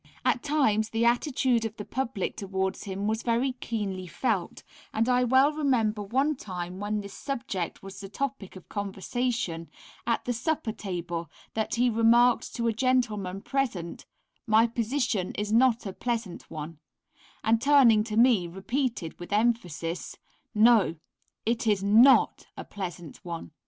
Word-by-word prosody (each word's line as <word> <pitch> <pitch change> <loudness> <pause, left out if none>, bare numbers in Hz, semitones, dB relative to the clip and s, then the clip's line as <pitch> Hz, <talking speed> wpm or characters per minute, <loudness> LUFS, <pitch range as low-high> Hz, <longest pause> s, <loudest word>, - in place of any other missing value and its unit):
At 245 - +2
times 225 -8 +1
the 225 +1 0
attitude 245 -1 +2
of 225 -1 -4
the 210 - -6
public 235 -6 -3
towards 190 0 -3
him 195 0 -4
was 220 +1 0
very 240 +3 +1
keenly 195 -5 -3
felt, 200 +2 -2 0.3
and 225 +2 0
I 250 0 +3
well 260 +4 +4
remember 240 -8 +1
one 270 +9 +1
time 180 -5 -6
when 210 +1 -2
this 200 -1 -9
subject 225 - -4
was 195 0 -9
the 195 -1 -8
topic 260 -5 -4
of 185 - -12
conversation 200 -3 -3 0.4
at 230 - 0
the 245 - 0
supper 245 0 -1
table, 175 -5 -5 0.2
that 220 0 -1
he 245 +1 +3
remarked 235 +1 +3
to 235 -1 -1
a 230 - +2
gentleman 215 -6 0
present, 230 -12 -3 0.4
"my 220 +1 +5
position 230 -4 -1
is 210 +1 -2
not 240 -1 +4
a 195 - -4
pleasant 225 -5 -4
one," 155 0 -7 0.6
and 225 +1 +3
turning 260 -7 +6
to 215 -1 -3
me, 230 -7 +5
repeated 195 - -3
with 175 - -9
emphasis, 190 -7 -1 0.4
"no! 215 -5 +5 0.5
it 230 0 0
is 205 -2 +2
not 225 +7 +5
a - - -5
pleasant 175 -5 -7
one." 170 -2 -6
220 Hz, 150 wpm, -27 LUFS, 195-245 Hz, 0.6 s, turning